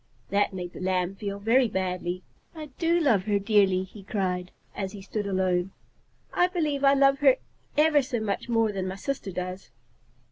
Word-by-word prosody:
That 205 Hz, +1 st, +2 dB
made 180 Hz, -2 st, -6 dB
the -, -, -9 dB
Lamb 185 Hz, 0 st, 0 dB
feel 200 Hz, 0 st, -5 dB
very 235 Hz, +5 st, +3 dB
badly. 185 Hz, -2 st, -2 dB, 0.3 s
"I 305 Hz, -3 st, -8 dB
do 340 Hz, 0 st, +3 dB
love 230 Hz, -, +3 dB
her 205 Hz, -1 st, +2 dB
dearly," 195 Hz, -2 st, +3 dB
he 195 Hz, +2 st, -12 dB
cried, 185 Hz, -2 st, -2 dB, 0.3 s
as 195 Hz, 0 st, -4 dB
he 200 Hz, -, -8 dB
stood 205 Hz, +1 st, -3 dB
alone. 185 Hz, -1 st, 0 dB, 0.6 s
"I 355 Hz, -, +4 dB
believe 305 Hz, -6 st, -1 dB
I 275 Hz, 0 st, +6 dB
love 275 Hz, 0 st, +4 dB
her 270 Hz, -3 st, +6 dB, 0.4 s
ever 300 Hz, -1 st, +5 dB
so 255 Hz, -3 st, -3 dB
much 215 Hz, +2 st, -3 dB
more 225 Hz, -2 st, +2 dB
than 190 Hz, -2 st, -3 dB
my 185 Hz, -, -4 dB
sister 230 Hz, -1 st, -4 dB
does." 180 Hz, 0 st, -5 dB
200 Hz, 180 wpm, -27 LUFS, 185-270 Hz, 0.6 s, I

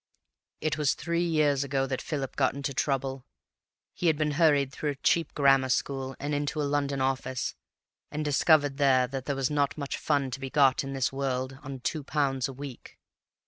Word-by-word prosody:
"It 155 Hz, 0 st, -1 dB
was 150 Hz, -3 st, +2 dB
three 170 Hz, 0 st, -1 dB
years 150 Hz, -5 st, +2 dB
ago 135 Hz, -1 st, 0 dB
that 130 Hz, -1 st, -3 dB
Philip 140 Hz, -4 st, -4 dB
got 130 Hz, -1 st, +1 dB
into 140 Hz, 0 st, -3 dB
trouble. 135 Hz, -1 st, -1 dB, 0.7 s
He 175 Hz, -, -1 dB
had 160 Hz, -2 st, +3 dB
been 150 Hz, 0 st, 0 dB
hurried 145 Hz, -3 st, +3 dB
through 150 Hz, +1 st, -3 dB
a 145 Hz, -, -2 dB
cheap 165 Hz, -1 st, +2 dB
grammar 135 Hz, -2 st, +4 dB
school 135 Hz, +1 st, -1 dB
and 145 Hz, +1 st, -3 dB
into 145 Hz, +1 st, -1 dB
a -, -, +1 dB
London 140 Hz, -1 st, 0 dB
office, 130 Hz, -1 st, -1 dB, 0.6 s
and 150 Hz, +1 st, -3 dB
discovered 145 Hz, -1 st, +3 dB
there 135 Hz, -3 st, +4 dB
that 135 Hz, 0 st, -5 dB
there 140 Hz, -, -1 dB
was 135 Hz, +1 st, 0 dB
not 145 Hz, -1 st, +1 dB
much 140 Hz, -2 st, -4 dB
fun 140 Hz, -3 st, 0 dB
to 125 Hz, -, -5 dB
be 135 Hz, 0 st, -5 dB
got 135 Hz, -2 st, +4 dB
in 135 Hz, 0 st, -5 dB
this 135 Hz, 0 st, 0 dB
world 130 Hz, -1 st, -2 dB
on 135 Hz, -2 st, -7 dB
two 155 Hz, +3 st, -2 dB
pounds 135 Hz, -2 st, 0 dB
a 135 Hz, -, -7 dB
week. 135 Hz, -1 st, -9 dB
140 Hz, 195 wpm, -28 LUFS, 135-145 Hz, 0.7 s, grammar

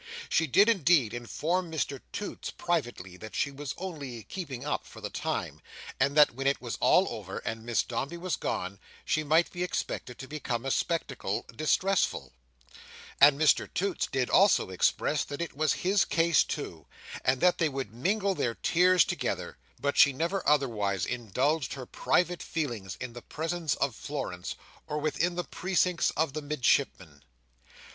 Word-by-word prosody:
She 165 Hz, -, +2 dB
did, 200 Hz, -, +5 dB
indeed, 165 Hz, -, +3 dB
inform 165 Hz, +9 st, -2 dB
Mr 140 Hz, -4 st, -2 dB
Toots 205 Hz, -, -5 dB
privately, 120 Hz, -, -3 dB
that 110 Hz, +2 st, -9 dB
she 140 Hz, -, 0 dB
was 140 Hz, 0 st, -6 dB
only 145 Hz, -, -6 dB
"keeping 140 Hz, -, -6 dB
up" 150 Hz, -, -1 dB
for -, -, -12 dB
the -, -, -6 dB
time, -, -, -3 dB, 0.4 s
and 140 Hz, +2 st, +2 dB
that 150 Hz, -4 st, +7 dB
when 135 Hz, +3 st, -2 dB
it 140 Hz, -, +2 dB
was 120 Hz, -2 st, -4 dB
all -, -, +5 dB
over, -, -, -6 dB
and 110 Hz, 0 st, -4 dB
Miss 120 Hz, 0 st, +1 dB
Dombey 135 Hz, +7 st, -4 dB
was 180 Hz, +1 st, -2 dB
gone, 100 Hz, +2 st, -3 dB, 0.3 s
she 155 Hz, -, +1 dB
might 160 Hz, +3 st, +3 dB
be 175 Hz, -, -6 dB
expected 145 Hz, -7 st, -3 dB
to 130 Hz, -, -8 dB
become 130 Hz, -5 st, -3 dB
a 135 Hz, -, 0 dB
spectacle 135 Hz, -, -1 dB
distressful; 185 Hz, -, +1 dB, 0.9 s
and 140 Hz, 0 st, +8 dB
Mr 155 Hz, -2 st, +3 dB
Toots 195 Hz, +1 st, -1 dB
did 130 Hz, -2 st, 0 dB
also 195 Hz, -, +4 dB
express 135 Hz, +10 st, +1 dB
that 145 Hz, -, -6 dB
it 170 Hz, -4 st, -4 dB
was 155 Hz, 0 st, +2 dB
his 195 Hz, +2 st, +4 dB
case 170 Hz, 0 st, +3 dB
too, 85 Hz, -, -6 dB, 0.4 s
and 130 Hz, 0 st, +2 dB
that 180 Hz, +4 st, +3 dB
they 165 Hz, -2 st, +3 dB
would 135 Hz, -6 st, -5 dB
mingle 195 Hz, -, 0 dB
their 115 Hz, -10 st, -1 dB
tears 180 Hz, +1 st, +4 dB
together; -, -, -3 dB, 0.2 s
but 140 Hz, +3 st, -1 dB
she 140 Hz, -, +7 dB
never 170 Hz, +7 st, -1 dB
otherwise 110 Hz, -10 st, +1 dB
indulged 125 Hz, +5 st, -1 dB
her 130 Hz, -2 st, -7 dB
private 175 Hz, +7 st, 0 dB
feelings 120 Hz, -, -4 dB
in 125 Hz, -2 st, -6 dB
the 120 Hz, -, -9 dB
presence 160 Hz, 0 st, -2 dB
of 140 Hz, -3 st, 0 dB
Florence 90 Hz, -12 st, -5 dB, 0.3 s
or 150 Hz, -, -3 dB
within 155 Hz, +3 st, 0 dB
the 175 Hz, -, -1 dB
precincts 180 Hz, -1 st, +1 dB
of 155 Hz, -2 st, +1 dB
the 155 Hz, -, -3 dB
Midshipman. 130 Hz, -, 0 dB
145 Hz, 165 wpm, -29 LUFS, 120-170 Hz, 0.9 s, and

